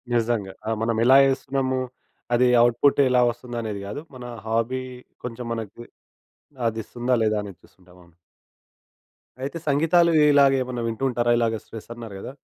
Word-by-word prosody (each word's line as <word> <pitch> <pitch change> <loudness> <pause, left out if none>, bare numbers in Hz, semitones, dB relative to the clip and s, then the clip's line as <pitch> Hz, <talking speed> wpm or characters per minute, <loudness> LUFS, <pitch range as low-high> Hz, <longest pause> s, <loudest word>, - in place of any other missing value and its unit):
నిజంగా. 110 -5 0
ఆహ్, 110 - 0
మనమెలా 115 +3 +4
యేస్తున్నము. 135 -1 -1 0.5
అది 125 +1 +4
అవుట్‌పుట్టెలా 125 +1 +3
వస్తందనేది 115 -4 -6
గాదు. 105 +9 -6
మనా 125 -1 -8 0.2
హాబీ 115 +3 -1 0.4
కొంచం 120 0 -6
మనకి 115 +1 -7 0.8
అదిస్తుందా 120 +3 -2
లేదా 110 0 +1
అనేది 100 -3 -10
చూస్తుంటాం. 90 -1 -22
అవును. 85 -1 -22 1.3
అయితే, 145 +5 -4
సంగీతాలు 165 +4 +3 0.2
ఇలాగేమన్నా 130 -3 +3
వింటూ 115 +3 -4
ఉంటారా? 120 0 0
ఇలాగ 115 -1 +1
స్ట్రెస్సన్నారు 115 -1 -9
గదా! 115 - -7
120 Hz, 120 wpm, -24 LUFS, 110-130 Hz, 1.3 s, మనమెలా